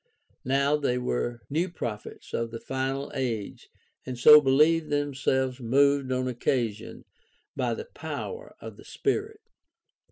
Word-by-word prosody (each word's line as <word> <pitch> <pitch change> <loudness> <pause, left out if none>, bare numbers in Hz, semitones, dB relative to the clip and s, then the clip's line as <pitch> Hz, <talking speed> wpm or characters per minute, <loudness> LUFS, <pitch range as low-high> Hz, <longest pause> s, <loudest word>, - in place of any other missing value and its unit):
Now 140 +3 +2
they 140 -4 0
were 120 - -2
new 165 +6 -1
prophets 115 -10 -7
of 115 0 -1
the 115 0 -7
final 135 +2 -3
age 120 -7 -4 0.3
and 130 -1 -6
so 150 +4 +9
believed 150 +4 +3
themselves 130 -2 0
moved 140 +2 +2
on 130 0 0
occasion 120 -3 -2 0.5
by - - -1
the 455 - -7
power 480 0 -7
of - - -10
the - - -14
Spirit. 425 +1 -2
135 Hz, 130 wpm, -27 LUFS, 125-150 Hz, 0.5 s, so